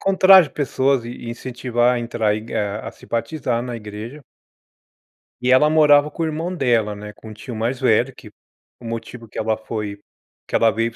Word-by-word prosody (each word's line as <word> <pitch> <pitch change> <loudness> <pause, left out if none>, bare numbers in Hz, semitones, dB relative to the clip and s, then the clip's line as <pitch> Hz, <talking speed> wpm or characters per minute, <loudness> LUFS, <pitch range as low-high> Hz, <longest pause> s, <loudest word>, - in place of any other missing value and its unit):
encontrar 190 -1 +7
as 160 - -5
pessoas 135 -2 0
e 120 - -6
e 120 -1 -7
incentivar 120 0 0
a - - -1
entrar, 115 -3 0
e 105 - -3
ga 105 -1 -3
a - - -4
se - - -17
batizar 120 -1 -2
na 125 -1 -5
igreja. 110 +6 -8 1.2
E 125 - +2
ela 150 +4 +5
morava 150 -1 +5
com 165 - -3
o - - +1
irmão 160 +3 -3
dela, 120 - +1
né, 105 0 -9
com 110 - -13
o - - -9
tio 110 +3 -8
mais 120 +4 -2
velho 125 +1 +2
que - - -14 0.5
o 120 - -13
motivo 115 +1 -6
que - - -7
ela 110 0 0
foi 105 -2 -5 0.5
que - - -3
ela 115 -1 +4
veio 115 +1 0
para 115 - -19
120 Hz, 210 wpm, -21 LUFS, 110-135 Hz, 1.2 s, encontrar